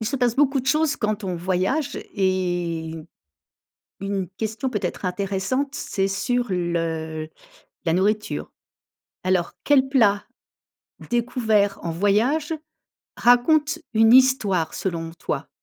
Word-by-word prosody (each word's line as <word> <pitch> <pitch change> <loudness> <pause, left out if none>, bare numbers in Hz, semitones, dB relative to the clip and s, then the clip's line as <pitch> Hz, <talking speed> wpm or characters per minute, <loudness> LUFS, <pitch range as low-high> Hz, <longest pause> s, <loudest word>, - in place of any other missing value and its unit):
Il 220 - -3
se 275 - -1
passe 245 -2 +1
beaucoup 275 -1 +3
de 255 - -12
choses 305 +2 +2
quand 210 0 -2
on 185 -2 -2
voyage 185 - -1
et 175 -4 -1 1.1
1 195 -2 -2
question 220 +4 -2
peut-être 205 -6 -3
intéressante, 200 +9 -1
c'est 195 -9 -1
sur 245 +6 0
le 165 -3 -2 0.6
la 165 - +2
nourriture. 210 +4 0 0.7
Alors, 185 -2 +1
quel 270 -2 +4
plat 210 -7 +3 0.9
découvert 225 -4 +1
en 170 - -3
voyage 225 - +1 0.6
raconte 295 +6 +4 0.2
une 225 +1 +6
histoire 220 -10 +4
selon 165 -3 -3
toi? - - -3
205 Hz, 115 wpm, -23 LUFS, 180-250 Hz, 1.1 s, une